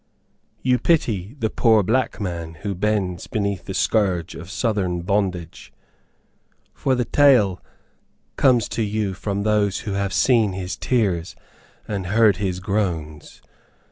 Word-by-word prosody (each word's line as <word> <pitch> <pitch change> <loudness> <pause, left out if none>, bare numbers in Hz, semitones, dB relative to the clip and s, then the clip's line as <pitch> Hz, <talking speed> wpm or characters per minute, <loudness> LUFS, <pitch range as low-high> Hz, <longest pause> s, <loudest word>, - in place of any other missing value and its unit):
You 125 -1 +2
pity 115 - 0
the 110 -5 -1
poor 110 -3 +4
black 120 +6 0
man 85 -4 -4
who 100 -2 -2
bends 95 -3 -1
beneath 100 -4 -2
the 95 - -5
scourge 95 -6 +1
of 85 +2 -9
southern 100 -5 -1
bondage, 95 -4 -2 1.0
for 130 - 0
the 125 -1 0
tale 115 -10 +4 0.7
comes 125 -5 +3
to - - -2
you 105 -2 -1
from 100 +1 -3
those 105 -1 +1
who 110 -4 -5
have 100 0 -1
seen 115 -5 +3
his 90 0 -4
tears 95 -9 -1 0.5
and 100 -4 -3
heard 105 +1 +4
his 95 -2 -2
groans. 90 -7 -3
100 Hz, 135 wpm, -22 LUFS, 90-110 Hz, 1.0 s, poor